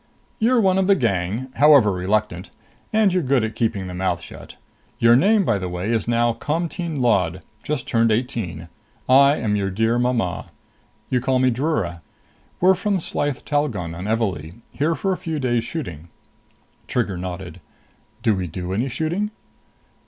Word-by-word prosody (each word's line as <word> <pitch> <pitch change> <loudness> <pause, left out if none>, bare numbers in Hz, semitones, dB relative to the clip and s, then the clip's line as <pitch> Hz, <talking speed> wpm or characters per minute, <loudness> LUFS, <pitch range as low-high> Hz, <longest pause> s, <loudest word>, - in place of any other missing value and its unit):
"You're 240 +2 +3
one 190 -3 +3
of 190 - +1
the 200 - +5
gang, 100 - -1
however 140 -7 +6
reluctant. 90 -1 -1 0.4
And 215 -3 +3
you're 185 - +2
good 135 -4 +1
at 110 0 -2
keeping 105 -4 -1
the 90 - -6
mouth 90 -1 -1
shut. - - -12 0.4
Your 115 0 +5
name, 200 - +4
by 110 -7 +1
the 90 -1 -4
way, 90 +5 -3
is 115 -1 0
now 120 0 +2
Comteen 165 +1 -3
Lod, 90 -8 +1 0.2
just 150 -4 -3
turned 115 -1 +2
eighteen. 110 -8 -2 0.4
I 140 +2 +6
am 110 -6 -1
your 100 -1 0
dear 110 +5 +1
mama. 120 -7 -1 0.6
You 125 -1 +2
call 130 +1 +1
me 130 0 +3
Drura. 115 - -1 0.6
We're 185 +2 +5
from 200 +1 0
Slyth 145 -4 -3
Talgon 120 - -1
on 85 +3 -6
Evalee, 100 -4 -2
here 155 +3 0
for 190 +6 -1
a - - -4
few 165 -3 -4
days 120 -4 0
shooting." 90 - -6 0.8
Trigger 110 -6 -1
nodded. 90 -1 -7 0.6
"Do 110 - +3
we 95 -2 -2
do 90 +2 -5
any 120 +7 -1
shooting?" 170 - -2
120 Hz, 165 wpm, -22 LUFS, 95-150 Hz, 0.8 s, however